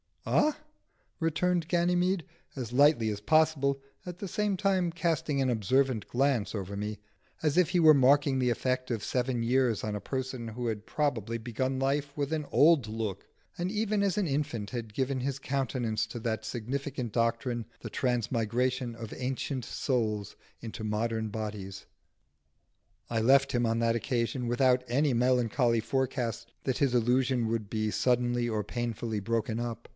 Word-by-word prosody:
"Ah?" 300 0 +2 0.6
returned 170 +1 +1
Ganymede, 175 +1 +1 0.3
as 125 -3 -5
lightly 140 -4 +5
as 105 -1 -3
possible, 140 +2 +2 0.2
at 180 -1 -7
the 200 - -4
same 210 +1 0
time 185 -2 +1
casting 165 -4 0
an 130 - +2
observant 125 +1 +1
glance 125 -5 +1
over 100 -1 -4
me, 105 +1 -4 0.4
as 155 0 +1
if 180 -2 +4
he 180 0 +2
were 160 -2 +8
marking 140 0 +4
the 125 -1 +2
effect 130 +2 -1
of 115 -3 -2
seven 125 -1 -1
years 125 -2 +2
on 105 -1 -2
a - - -3
person 130 -3 -4
who 120 +2 -4
had 110 -1 -3
probably 115 -7 -1
begun 130 +3 -2
life 140 +1 0
with 145 +1 -2
an 155 -2 -1
old 150 -6 +5
look, 110 -3 -4 0.3
and 175 +2 -2
even 210 -1 0
as 195 -2 +1
an 200 -4 +1
infant 135 -8 -2
had 115 -3 -5
given 130 +2 -1
his 135 +1 -2
countenance 130 -5 -1
to 115 +2 -6
that 110 -1 -2
significant 125 +1 -4
doctrine, 115 +1 0 0.2
the - - -6
transmigration 125 0 0
of 115 -1 -7
ancient 130 0 -3
souls 110 -8 -1 0.3
into 110 -1 -7
modern 110 +1 -1
bodies. 105 -3 -6 1.2
I 115 -1 0
left 135 +4 +5
him 120 -1 +1
on 115 0 +1
that 115 0 +2
occasion 120 0 -1
without 125 +1 +3
any 140 +3 +2
melancholy 120 -1 +2
forecast 120 -2 -2
that 130 -2 -1
his 135 -3 +2
illusion 125 0 +2
would 110 -2 -2
be 110 -1 0
suddenly 120 0 +1
or 110 -2 -1
painfully 115 0 -3
broken 115 +2 -1
up. 115 -1 -5
125 Hz, 160 wpm, -29 LUFS, 115-140 Hz, 1.2 s, were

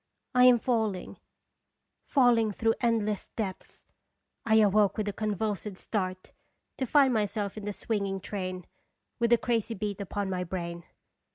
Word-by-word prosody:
I 250 0 +6
am 250 -1 +8
falling, 220 -6 -1 0.9
fall 245 -4 +5
ing 220 -2 +1
through 225 +2 +1
endless 220 -4 0
depths. 195 -5 -5 0.6
I 220 - +4
awoke 210 -1 +4
with 215 -1 -1
a 205 - -2
convulsive 210 -2 -2
start, 185 -3 -3 0.5
to 260 - -1
find 275 -1 +4
myself 205 -2 -1
in 210 -2 -7
the 205 - -2
swinging 200 -3 -2
train, 185 -2 -5 0.5
with 235 0 +2
the 235 - +6
crazy 230 -1 -1
beat 205 0 -4
upon 200 +1 -3
my 185 -1 -2
brain. 170 -1 -5
210 Hz, 150 wpm, -29 LUFS, 195-225 Hz, 0.9 s, am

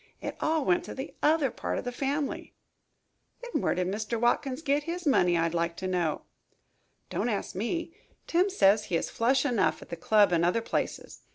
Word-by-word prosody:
It - - -5
all 315 -2 +1
went 180 -1 +2
to - - -7
the 265 +2 -6
other 300 -3 +3
part - - -3
of - - -3
the 245 - -2
family." 280 +3 -3 0.9
"Then 485 - -2
where - - +1
did 180 - 0
Mr. 215 +4 -2
Watkins 255 +4 0
git 290 0 +1
his 345 +1 -4
money, 180 - +3
I'd 165 0 0
like 170 0 -1
to 190 - -3
know." 175 -4 -1 0.9
"Don't - - -1
ask 205 -3 -3
me. 330 - -3 0.3
Tim 360 +4 +2
says 210 - +4
he 175 - -2
is 165 - -1
flush 260 +4 +2
enough 245 -7 +1
at - - -18
the - - -4
club 205 +3 +3
and 170 -1 +2
other 180 +6 +2
places. - - -3
235 Hz, 195 wpm, -28 LUFS, 180-290 Hz, 0.9 s, says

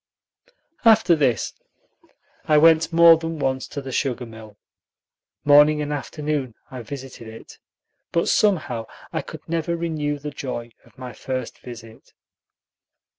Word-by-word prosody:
After 220 -6 +5
this 130 -9 0 0.9
I 150 - +4
went 160 +1 +5
more 165 0 +7
than 165 0 -5
once 130 -2 -1
to 140 -1 -7
the 135 - -6
sugar 125 -2 -1
mill. 110 -2 -13 0.9
Morning 150 +1 +6
and 150 0 -2
afternoon 145 -3 -3 0.2
I 130 -2 -7
visited 130 -1 -9
it, 110 0 -12 0.5
but 170 - +1
somehow 155 - +1 0.3
I - - -1
could - - -11
never 170 +1 -1
renew 155 -3 -2
the 145 +1 -7
joy 120 -4 -6
of - - -24
my 125 -1 -8
first 130 +2 -5
visit. 115 -2 -12
145 Hz, 130 wpm, -23 LUFS, 125-160 Hz, 0.9 s, more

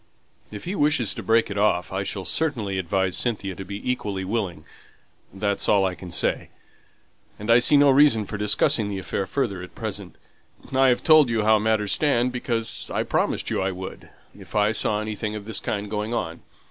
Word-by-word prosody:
"If 105 - -8
he 180 - -4
wishes 145 - +1
to - - -6
break 115 -1 +2
it 100 - -3
off, 95 -3 +1
I 95 - -1
shall 95 -1 -4
certainly 115 -12 -1
advise 95 +1 0
Cynthia 100 -5 -1
to 95 - -8
be 100 +4 -7
equally 100 -6 -2
willing, 95 -7 -3 0.7
that's 100 +1 -1
all 100 -2 +4
I 95 - -1
can 90 +1 -10
say. - - -1 0.9
And 105 +3 -1
I 120 - +7
see 145 +4 +5
no 140 -1 +6
reason 135 -6 +4
for 105 - -6
discussing 105 +1 +2
the 100 - -4
affair 95 0 -3
further 110 -9 -2
at 90 - -11
present. 100 -5 -5 0.6
I've 130 -2 +3
told 155 -5 +6
you 115 -2 0
how 110 0 +4
matters 105 -1 0
stand 125 -5 +2
because 120 -2 -2
I - - 0
promised - - -1
you - - 0
I 95 +1 0
would, 95 +1 -9 0.3
if - - -13
I 105 0 +3
saw 105 -1 0
anything 110 0 -4
of 105 -1 -7
this 110 -1 -2
kind 105 0 -3
going 105 +3 -3
on. 80 -7 -4
105 Hz, 195 wpm, -24 LUFS, 95-115 Hz, 0.9 s, I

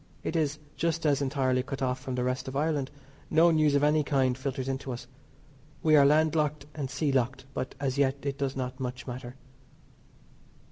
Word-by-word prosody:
It 160 - -3
is, 150 -2 +1 0.2
just 165 0 0
as 145 -2 +3
entirely 130 -2 +1
cut 135 +1 -5
off 125 0 0
from 130 - -4
the 125 - 0
rest 130 +1 -2
of 130 - -5
Ireland; 145 -2 0 0.4
no 165 +2 +5
news 155 -2 +3
of 140 - +3
any 150 +1 +4
kind 135 -3 +2
filters 130 0 -3
in 135 0 -1
to 135 - -6
us. 120 - -7 0.8
We 155 -1 +5
are 140 -1 +7
land 155 +1 +4
locked 150 -2 0
and 140 -4 -4
sea 140 +2 0
locked, 135 0 0
but, 130 - -4
as 135 -1 -1
yet, 135 -1 +3
it 140 0 -3
does 140 -1 -1
not 130 0 -4
much 125 -1 -4
matter. 125 0 -7
135 Hz, 200 wpm, -29 LUFS, 130-150 Hz, 0.8 s, are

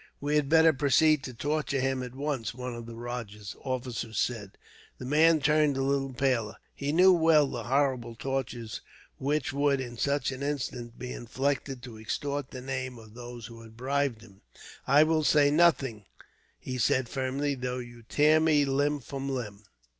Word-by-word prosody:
"We 145 +1 -2
had 145 -2 +2
better 160 0 +6
proceed 145 +2 +3
to 130 - -6
torture 145 +1 -1
him, 135 0 0
at 125 0 -7
once," 135 -7 -3
one 125 -1 -5
of 120 -1 -8
the 115 - -8
rajah's 115 -4 -6
officers 125 -4 -4
said. 105 -5 -2 0.4
The 125 - -8
man 155 +3 +4
turned 150 -1 +3
a 135 - 0
little 135 0 0
paler. 125 -5 0 0.2
He 140 +1 -3
knew 185 +4 +6
well 160 -3 +5
the 120 -4 -5
horrible 130 -2 0
tortures 120 -3 -4 0.4
which 145 0 -1
would, 140 -1 +2
in 120 -2 -6
such 140 -1 0
an 130 0 -7
instance, 135 -4 -3
be 125 0 -6
inflicted 135 +1 -2
to 115 -4 -9
extort 140 +5 -3
the 130 - -8
names 130 -1 -4
of 110 -2 -14
those 120 -1 -9
who 115 0 -11
had 110 0 -14
bribed 135 -2 -1
him. 100 -4 -18 0.5
"I 145 +2 +6
will 155 0 +1
say 145 -1 +4
nothing," 140 - +2 0.5
he 130 0 -5
said, 130 +2 +2
firmly, 135 +3 -1
"though 125 -1 -3
you 120 -1 -9
tear 150 +7 +3
me 155 -2 +3
limb 145 +1 0
from 135 +2 -5
limb." 110 -6 -4
135 Hz, 175 wpm, -28 LUFS, 120-145 Hz, 0.5 s, better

